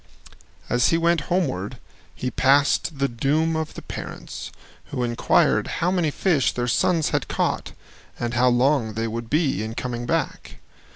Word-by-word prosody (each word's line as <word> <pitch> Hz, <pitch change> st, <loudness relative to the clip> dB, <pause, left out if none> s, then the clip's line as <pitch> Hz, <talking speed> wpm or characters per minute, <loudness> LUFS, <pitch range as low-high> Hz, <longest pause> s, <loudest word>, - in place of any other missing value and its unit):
As 120 Hz, 0 st, +3 dB
he 165 Hz, -, +3 dB
went 170 Hz, -1 st, +2 dB
homeward, 125 Hz, -, -1 dB, 0.4 s
he 125 Hz, -, -3 dB
passed 140 Hz, +3 st, +3 dB
the 140 Hz, 0 st, +1 dB
doom 150 Hz, +7 st, 0 dB
of 160 Hz, -1 st, -3 dB
the -, -, -8 dB
parents, -, -, -7 dB, 0.3 s
who 125 Hz, -, -3 dB
inquired 120 Hz, -1 st, +2 dB
how 175 Hz, +2 st, +1 dB
many 175 Hz, -4 st, +1 dB
fish 145 Hz, -, +1 dB
their 120 Hz, 0 st, -2 dB
sons 165 Hz, +5 st, +2 dB
had -, -, -1 dB
caught -, -, -1 dB, 0.5 s
and 120 Hz, 0 st, -2 dB
how 125 Hz, +1 st, +3 dB
long 125 Hz, -2 st, +2 dB
they 115 Hz, +1 st, -1 dB
would 115 Hz, +1 st, -5 dB
be 145 Hz, -, +1 dB
in 110 Hz, +1 st, -5 dB
coming 120 Hz, -1 st, -4 dB
back. -, -, -2 dB
135 Hz, 160 wpm, -23 LUFS, 120-160 Hz, 0.5 s, As